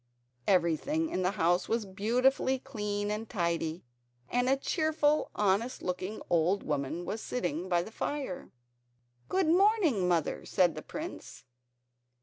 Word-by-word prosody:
Everything 195 - +2
in 185 - -1
the 180 - +2
house 175 0 +2
was 230 -1 0
beautifully 250 +7 +2
clean 210 -6 -3
and 215 +2 -4
tidy, 170 -4 -1 0.5
and 245 +1 +1
a 270 - +4
cheerful 305 0 +1
honest 210 +5 +1
looking 185 +4 -3
old 175 +4 +2
woman 150 +4 -2
was 220 +5 -4
sitting 180 -6 -3
by 175 -1 +2
the 220 - -10
fire. 270 -5 -4 0.8
"Good 380 -1 +2
morning, 345 - +4
mother," 170 -3 0
said 180 -4 +2
the 155 - -6
prince. 315 - -8
205 Hz, 135 wpm, -30 LUFS, 175-265 Hz, 0.8 s, a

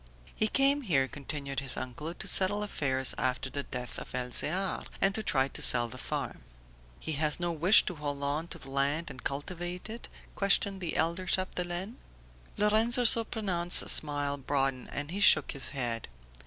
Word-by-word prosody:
"He 215 - +1
came 275 +4 +2
here," 145 - +1
continued 140 0 -6
his 135 -2 -3
uncle, 130 +5 -6
"to - - -5
settle 205 +2 +3
affairs 135 -9 0
after 130 +1 -2
the 140 - -2
death 125 -3 -6
of - - -9
Elzear, 150 +10 -1 0.2
and 195 - +1
to 220 - -2
try 135 -9 0
to - - -5
sell 120 -1 +7
the - - -10
farm." - - -5 0.6
"He - - -5
has 150 +1 -1
no 175 -1 -2
wish 170 +6 +5
to - - -4
hold 145 -3 -6
on 145 +4 -2
to - - -5
the 135 - -12
land 145 +4 -1
and 130 -2 -12
cultivate 175 +7 -5
it?" 230 - -9 0.3
questioned 200 -1 +2
the 175 - -4
elder 170 +3 -1
Chapdelaine. 185 +3 -2 0.6
Lorenzo 220 +4 +3
Surprenant's 210 -7 +4
smile 145 -1 +1
broadened 135 -2 -2
and 145 +2 -5
he 195 - -4
shook 155 -7 +5
his 140 - -2
head. 120 -5 -4
155 Hz, 170 wpm, -29 LUFS, 140-190 Hz, 0.6 s, sell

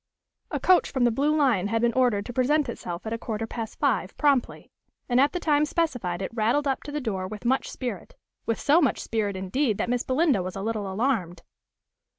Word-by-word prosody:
A - - -2
coach 370 -1 +4
from 260 -3 0
the 240 - +4
Blue 290 +6 +1
Lion 240 -10 +2
had 225 +2 0
been 235 -1 +3
ordered 240 -6 +2
to 245 - -7
present 275 +4 +2
itself 175 -6 -6
at 220 - -3
a 230 - -3
quarter 225 -1 -3
past 225 -1 -6
five, 245 -9 0
promptly; 280 -4 +1 0.4
and 245 0 +3
at 285 - +3
the 360 - -3
time 300 -3 +2
specified 245 - -1
it - - -4
rattled 235 +6 +1
up 270 - 0
to 290 - -6
the 300 - -2
door 195 -8 -3
with 215 +4 -9
much 260 +3 +1
spirit, 240 -8 -6 0.3
with 230 - 0
so 305 +4 +4
much 275 - +2
spirit, 210 -3 -2
indeed, 210 +4 0
that - - -2
Miss 245 -1 +1
Belinda 265 - +2
was 185 0 -5
a 195 - -4
little 215 -3 -2
alarmed. 190 -6 -1
240 Hz, 215 wpm, -26 LUFS, 205-280 Hz, 0.4 s, coach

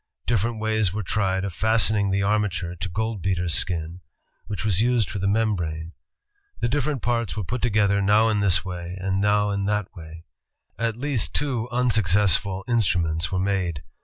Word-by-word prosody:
Different 115 0 0
ways 110 -3 +1
were 105 +2 -3
tried 95 0 0
of 100 - -4
fasten 110 +1 +2
ing 100 -1 +1
the 100 +1 +1
armature 100 -4 0
to 90 +2 -5
goldbeater's 95 -4 -1
skin, 85 0 -2 0.5
which 105 0 -4
was 100 -2 +2
used 120 -4 +1
for 100 - -4
the 100 - 0
membrane. 90 -7 -1 0.7
The - - +1
different 140 +1 -1
parts 115 -3 -1
were 105 - -1
put 125 +7 -4
together 100 -3 +2
now 105 +3 +4
in 105 -1 +1
this 95 -3 +2
way 90 0 -6
and 95 +1 -1
now 105 0 +2
in 100 0 -1
that 105 -1 -1
way. 80 0 -11 0.5
At 115 -1 -1
least 140 -3 -1
two 125 -5 -1
unsuccessful 105 -5 +2
instruments 85 -8 +1
were 95 - -1
made. 95 -5 -1
100 Hz, 170 wpm, -24 LUFS, 90-110 Hz, 0.7 s, now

